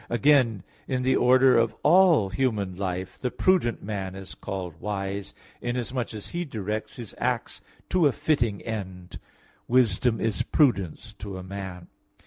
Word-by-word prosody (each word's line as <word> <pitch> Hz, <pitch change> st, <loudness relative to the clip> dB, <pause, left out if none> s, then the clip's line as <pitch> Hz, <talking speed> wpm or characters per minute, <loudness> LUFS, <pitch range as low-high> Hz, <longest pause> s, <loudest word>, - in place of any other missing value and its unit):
Again, 120 Hz, -, +3 dB, 0.2 s
in 130 Hz, -1 st, -1 dB
the 130 Hz, -, +3 dB
order 130 Hz, +1 st, +5 dB
of 115 Hz, -1 st, +1 dB
all 165 Hz, -, +5 dB
human 105 Hz, -5 st, -1 dB
life, 95 Hz, -1 st, -4 dB
the 125 Hz, -, -1 dB
prudent 175 Hz, -7 st, +1 dB
man 95 Hz, -2 st, -4 dB
is 95 Hz, -1 st, -8 dB
called 90 Hz, -4 st, -6 dB
wise, 100 Hz, -1 st, -4 dB, 0.3 s
inasmuch 120 Hz, 0 st, -2 dB
as 105 Hz, -, -7 dB
he 175 Hz, +1 st, -2 dB
directs 110 Hz, -, -4 dB
his 120 Hz, -6 st, -8 dB
acts 125 Hz, -1 st, -2 dB, 0.3 s
to 180 Hz, -5 st, +4 dB
a -, -, +2 dB
fitting 125 Hz, -8 st, 0 dB
end: 95 Hz, -5 st, -6 dB, 0.5 s
"Wisdom 120 Hz, -1 st, +3 dB
is 110 Hz, -4 st, 0 dB
prudence 110 Hz, -, +1 dB
to 100 Hz, -2 st, -6 dB
a 95 Hz, -, -7 dB
man" 95 Hz, -1 st, -6 dB
(Prov. -, -, -16 dB
110 Hz, 150 wpm, -26 LUFS, 95-130 Hz, 0.5 s, order